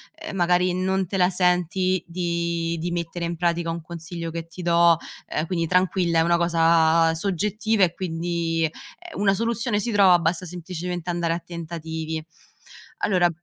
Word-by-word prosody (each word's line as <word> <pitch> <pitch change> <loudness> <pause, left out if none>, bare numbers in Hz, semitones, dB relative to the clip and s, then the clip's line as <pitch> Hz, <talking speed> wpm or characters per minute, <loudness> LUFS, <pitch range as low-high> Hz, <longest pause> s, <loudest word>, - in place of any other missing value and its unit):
ehm, 320 -9 -8
magari 180 0 +2
non 190 +1 0
te 195 - -3
la 180 -1 +4
senti 180 0 +1
di 170 -1 -2
di 175 +2 -3
mettere 170 0 -3
in 170 0 -3
pratica 170 -1 0
un 165 0 -4
consiglio 165 0 -6
che 165 0 -5
ti 175 +2 -10
do, 170 -1 +4 0.3
ehm, 155 - -2
quindi 170 -1 -1
tranquilla, 180 -1 +2
è - - +5
una 170 +1 +3
cosa 165 -1 +4
soggettiva 205 +4 0
e 175 -2 +3
quindi, 165 -2 -2
ehm, 345 - -9
una 195 -1 +4
soluzione 230 +1 0
si 230 +3 -2
trova, 195 -4 +6
basta 170 +2 -1
semplicemente 175 0 -5
andare 170 -1 0
a 170 - -2
tentativi. 160 -2 -5 0.8
Allora 180 -3 +3
175 Hz, 160 wpm, -24 LUFS, 165-185 Hz, 0.8 s, trova